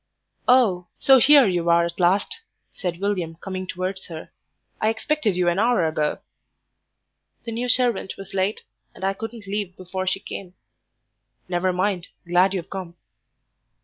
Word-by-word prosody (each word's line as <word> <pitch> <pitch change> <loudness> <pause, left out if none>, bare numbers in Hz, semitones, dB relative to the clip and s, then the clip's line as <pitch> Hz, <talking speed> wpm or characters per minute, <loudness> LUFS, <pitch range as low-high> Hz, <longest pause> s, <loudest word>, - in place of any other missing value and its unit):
"Oh, 215 -9 +4
so 270 -1 +6
here 280 +1 +7
you 175 -3 0
are 170 0 +5
at 170 +1 -6
last," 195 - +2 0.3
said 175 -2 -4
William, 185 -5 -2
coming 185 +1 -6
towards 185 +1 -4
her. 160 -2 -9 0.5
"I 215 - +3
expected 225 -2 0
you 180 -1 +1
an 175 +2 +2
hour 230 -6 +3
ago." 155 -1 -1 1.3
"The 230 - -6
new 240 +2 -3
servant 245 -5 +3
was 195 - -10
late, 195 +2 -1 0.3
and - - -11
I 195 0 +1
couldn't 225 +1 -8
leave 200 -2 -4
before 185 +1 -5
she 185 +1 0
came." 185 -2 -8 0.9
"Never 180 +1 0
mind; 180 -1 -1 0.2
glad 180 +3 +3
you've 175 -3 -5
come." 185 -3 -6
190 Hz, 150 wpm, -23 LUFS, 175-215 Hz, 1.3 s, here